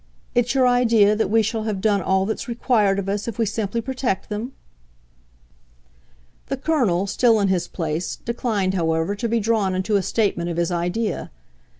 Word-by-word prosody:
It's 245 +2 +1
your 260 -1 +4
idea 230 -4 +4
that 220 - 0
we 225 +1 +3
shall 220 +1 -2
have 210 -3 -2
done 205 -1 +2
all 190 +2 +1
that's 220 +5 -3
required 225 -4 +1
of 195 -1 -3
us 200 +2 -2
if 230 - -5
we 230 - +1
simply 215 +1 -2
protect 255 -5 -2
them?" 220 +5 -4 1.9
The 270 - -2
Colonel, 250 - +1
still 225 +2 +3
in 200 -1 +2
his 185 -2 0
place, 165 0 -3
declined, 220 -5 -2
however, 165 0 0
to 230 +3 -3
be 230 +1 +1
drawn 210 -3 +1
into 195 +3 +1
a - - +1
statement 185 -3 0
of 170 - -4
his 170 +1 0
idea. 175 +6 -2
210 Hz, 180 wpm, -22 LUFS, 190-230 Hz, 1.9 s, your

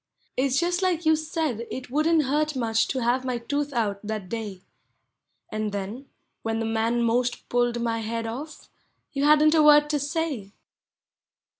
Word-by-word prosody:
It 270 +2 +1
's 260 - +2
just 350 +2 0
like 350 -3 0
you 315 0 +5
said 310 -7 -2
it 255 -1 -7
wouldn't 310 +2 +3
hurt 300 +2 0
much 225 -3 +1
to 260 -3 -2
have 245 +2 +1
my 255 -2 -1
tooth 285 +5 -2
out, 215 -6 -1
thai 215 +1 -2
day; 205 -1 -6 0.9
And 215 -1 -2
then, 205 +7 -5 0.3
when 225 0 -2
the 225 - -1
man 225 +2 +1
'most 245 +2 0
pulled 240 -1 +1
my 230 -1 -1
head 225 +1 -3
off, 270 +8 -7 0.5
you 280 0 0
hadn't 305 +1 +6
a 320 - +5
word 295 0 +6
to 295 - +1
say. 285 -8 -3
250 Hz, 170 wpm, -25 LUFS, 225-300 Hz, 0.9 s, hadn't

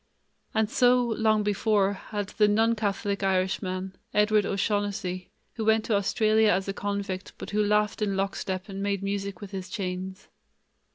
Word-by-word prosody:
And 220 -1 +3
so, 245 +2 +4
long 220 -2 +2
before, 205 -1 +2
had 205 0 -5
the 210 -1 +3
non 225 +2 +3
Catholic 200 -2 -1
Irishman, 185 0 -1 0.2
Edward 210 0 +3
O'Shaughnessy, 200 -2 -1 0.2
who 220 - -4
went 220 0 +3
to 220 - +1
Australia 215 +2 +3
as 190 0 +1
a 195 - -2
convict, 200 -2 -4
but - - -7
who 210 0 +2
laughed 210 +1 +1
in 200 -2 0
lockstep 190 -1 -2
and 195 -1 -6
made 200 -1 -1
music 200 -1 -3
with 200 -1 -8
his 190 -1 -6
chains. 190 -1 -5
205 Hz, 160 wpm, -27 LUFS, 195-215 Hz, 0.2 s, so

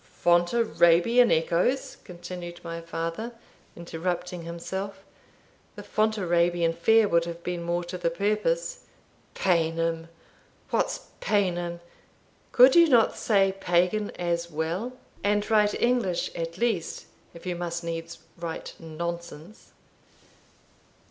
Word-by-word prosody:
"Fontarabian 175 +4 +3
echoes!" 170 +11 +1
continued 175 -1 -8
my 170 0 -5
father, 165 +7 -4 0.4
interrupting 175 +1 -4
himself; 190 +4 -6 0.7
"the - - -8
Fontarabian 175 -6 +1
Fair 220 +6 +4
would 170 -2 +2
have 170 0 -7
been 180 -1 -3
more 170 +1 -1
to 175 +1 -6
the 170 - +1
purpose 170 -2 -1 0.5
Paynim! 165 -2 0 0.6
What's - - -1
Paynim? 175 -4 0 0.7
Could 255 +2 +7
you 340 -1 +8
not 235 -5 +4
say 195 -3 +2
Pagan 180 +4 +1
as 170 -1 -1
well, 170 +10 -3 0.3
and 205 0 +1
write 210 -1 +3
English 235 -8 +1
at 165 +1 -5
least, 225 -7 -1 0.3
if 170 - -12
you 180 -1 -2
must 170 0 -4
needs 165 0 -5 0.2
write 170 -1 -5
nonsense? 170 +3 -7
175 Hz, 110 wpm, -26 LUFS, 170-205 Hz, 0.7 s, you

